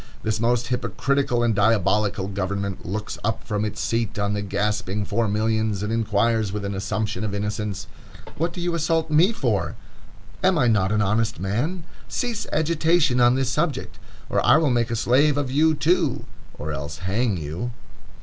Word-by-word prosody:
This 110 0 0
most 120 +1 +1
hypocritical 130 0 0
and 115 -2 +2
diabolical 105 -1 +2
government 100 0 -3
looks 105 +3 -4
up 110 +1 -1
from 105 -1 -2
its 105 - -3
seat 115 -2 -1
on 100 0 0
the 105 - -1
gasping 105 0 -1
four 115 +3 0
millions, 110 -1 0
and 105 +2 -2
inquires 110 -1 +1
with 105 0 -4
an 100 - -2
assumption 100 +1 -2
of 105 -2 -2
innocence: 105 -1 -3 0.5
"What 165 +2 -1
do 175 - -8
you 175 0 -1
assault 165 -1 0
me 165 +7 +5
for? 225 - -1 0.7
Am 185 -1 +4
I 125 - +3
not 105 -4 +2
an 105 0 +2
honest 110 +3 0
man? 125 - -2 0.2
Cease 240 -3 -3
agitation 160 -4 +2
on 120 +1 +5
this 130 -2 0
subject, 150 0 -2 0.3
or - - 0
I - - +6
will 155 -4 +2
make 120 -1 +1
a 115 - -1
slave 140 +6 +3
of 140 -3 -1
you, 155 +3 +3
too, 160 -2 +1 0.3
or 80 - -4
else 75 0 -5
hang 105 +1 +1
you." 80 +9 -4
110 Hz, 175 wpm, -23 LUFS, 100-140 Hz, 0.7 s, I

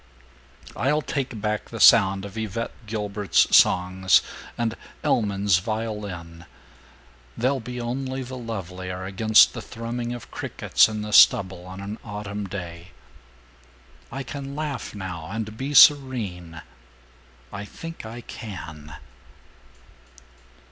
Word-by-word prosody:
"I'll 145 +5 +1
take 130 -5 -3
back 105 0 -2
the 115 - -7
sound 100 -4 +6
of 100 0 -10
Yvette 110 +1 -3 0.2
Guilbert's 105 -2 +1
songs 95 +1 +4 0.3
and 115 -1 -1 0.3
Elman's 100 -4 +2
violin. 100 -6 -5 0.9
They'll 130 +3 +1
be 125 +1 -7
only 130 +2 -3
the 130 +1 -8
lovelier 95 -6 -6
against 105 +3 +5
the - - -6
thrumming 120 +1 -5
of 120 -1 -8
crickets - - +2
in 105 -1 -4
the 105 0 -5
stubble 95 -3 +5
on 95 +1 -8
an 100 +2 -6
autumn 105 -1 -5
day. 90 -1 -8 1.2
"I 135 - -4
can 140 +1 -7
laugh 150 -7 -4
now 90 -5 -6
and 110 +1 -5
be 135 +5 -4
serene... 105 - +4 0.9
I 100 - -5
think 165 +10 -9
I 115 +2 -8
can." 80 -11 -9
105 Hz, 115 wpm, -24 LUFS, 95-120 Hz, 1.2 s, sound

